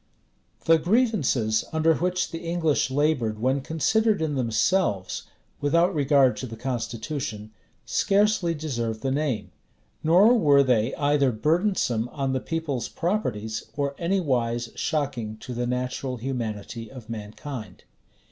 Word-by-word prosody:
} - - -36
The 165 0 +5
grievances 160 - +2
under 160 0 +3
which 180 +3 -1
the 165 - -4
English 165 -5 0
labored 135 -6 +1
when 130 +5 +1
considered 210 +9 +1
in 160 -2 -1
themselves, 115 - 0 0.3
without 170 +6 +2
regard 140 -3 +4
to 130 - -5
the 115 -1 -8
constitution, 115 -2 -4 0.3
scarcely 200 -4 +2
deserve 120 -8 -3
the 135 - -1
name; 130 -10 -1 0.5
nor 190 +9 +6
were 145 -10 +5
they 125 -2 +1
either 145 -2 +2
burdensome 150 - +1
on 135 -2 -2
the 130 - 0
people's 145 -6 -3
properties, 115 - -2
or 140 -1 0
anywise 125 -10 0
shocking 130 -9 -2
to 125 +3 -8
the 120 0 -2
natural 125 +1 -2
humanity 115 -3 -4
of 125 -5 -11
mankind. 110 +2 -7
135 Hz, 130 wpm, -25 LUFS, 115-165 Hz, 0.5 s, nor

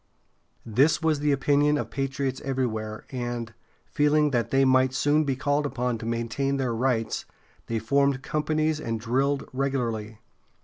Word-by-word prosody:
This 130 +8 +3
was 155 -2 +2
the 145 0 +1
opinion 145 +1 +3
of - - -4
patriots 135 -1 -2
everywhere, 110 -5 -3
and, 120 -3 -4 0.3
feeling 150 0 +2
that 120 -3 0
they 135 0 +3
might 130 0 +3
soon 150 +2 +2
be 135 -2 0
called 145 +2 0
upon 125 -4 -2
to 115 - -6
maintain 115 +4 -1
their 130 -3 -1
rights, 115 -1 -1 0.4
they 115 - -1
formed 140 +4 +1
companies 155 0 0
and 115 -6 -3
drilled 135 +5 0
regularly. 120 -5 -2
135 Hz, 145 wpm, -26 LUFS, 115-145 Hz, 0.4 s, This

